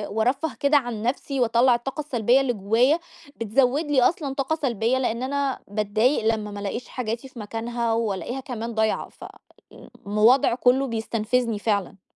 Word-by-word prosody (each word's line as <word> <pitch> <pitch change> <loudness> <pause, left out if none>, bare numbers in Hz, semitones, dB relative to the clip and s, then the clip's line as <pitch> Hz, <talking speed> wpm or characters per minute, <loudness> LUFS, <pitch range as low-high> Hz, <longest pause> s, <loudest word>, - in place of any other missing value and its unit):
وأرفَّه 255 +5 0
كده 285 +1 +4
عن 240 -5 -3
نفسي 270 +2 -2
وأطلّع 240 +1 +4
الطاقة 265 +5 -5
السلبية 250 -3 +2
اللي 255 -3 0
جوايا، 230 - +2 0.4
بتزود 250 +7 +1
لي 270 -3 +4
أصلًا 280 0 +1
طاقة 275 +3 -1
سلبية 245 -4 0
لأن 245 -2 -1
أنا 275 0 -1
باتضايق 215 +3 +1
لمّا 210 -1 -6
ما 205 - -7
لقيش 220 +4 -4
حاجاتي 235 +1 -4
في 250 - -12
مكانها 230 +2 -2
وألاقيها 225 +2 -2
كمان 235 -3 -5
ضايعة، 220 -1 0
ف - - -16 0.8
الوضع 225 +5 +4
كله 255 +2 +2
بيستنفذني 230 0 -1
فعلًا. 200 -3 -2
240 Hz, 155 wpm, -24 LUFS, 220-265 Hz, 0.8 s, كده